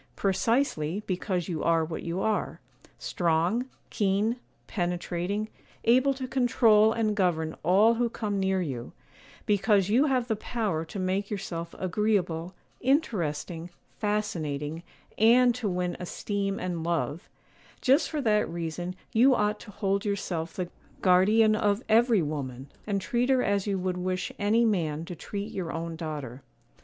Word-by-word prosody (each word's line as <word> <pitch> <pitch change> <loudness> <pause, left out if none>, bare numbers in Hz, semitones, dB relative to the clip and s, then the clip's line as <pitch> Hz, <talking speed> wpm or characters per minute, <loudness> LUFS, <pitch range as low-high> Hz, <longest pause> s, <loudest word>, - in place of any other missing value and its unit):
Precisely, 200 - 0
because 185 -1 -2
you 170 -4 -3
are 165 -1 +3
what 160 0 -5
you 170 +2 -3
are,—strong, 185 -1 -1 0.2
keen, 205 +4 +1 0.3
penetrating, 180 +2 -2 0.4
able 255 +4 +4
to 260 -1 -4
control 230 -4 +4
and 220 -2 0
govern 165 -5 0
all 200 +7 +5
who 235 0 0
come 210 -3 -2
near 190 -1 +1
you; 125 -7 -5 0.5
because 205 -1 +3
you 250 +7 +4
have 255 -3 +1
the 220 - 0
power 210 -7 -2
to 165 +5 -8
make 190 +2 -1
yourself 170 -5 -5
agreeable, 185 -3 0 0.2
interesting, 175 - -1 0.3
fascinating, 165 -8 -2 0.4
and 240 +3 +6
to 230 -4 -2
win 180 -1 -1
esteem 195 +2 -3
and 175 -3 -3
love,—just 170 - -1
for 305 -2 -2
that 210 -7 +2
reason 170 +2 -4 0.2
you 255 +4 +5
ought 210 -1 0
to - - -12
hold 200 -1 -1
yourself 175 -5 -3
the 180 -2 -2 0.3
guardian 210 +4 +5
of 205 +1 +1
every 225 -3 +4
woman, 135 -3 -5 0.2
and 200 -2 0
treat 240 +5 0
her 260 -1 +4
as 200 0 0
you 200 -1 0
would 185 -1 -2
wish 185 0 -2
any 220 +3 +3
man 165 -7 0
to 175 - -7
treat 200 +5 -5
your 175 -4 -4
own 165 0 -4
daughter. 150 -6 -6
195 Hz, 140 wpm, -28 LUFS, 170-220 Hz, 0.5 s, and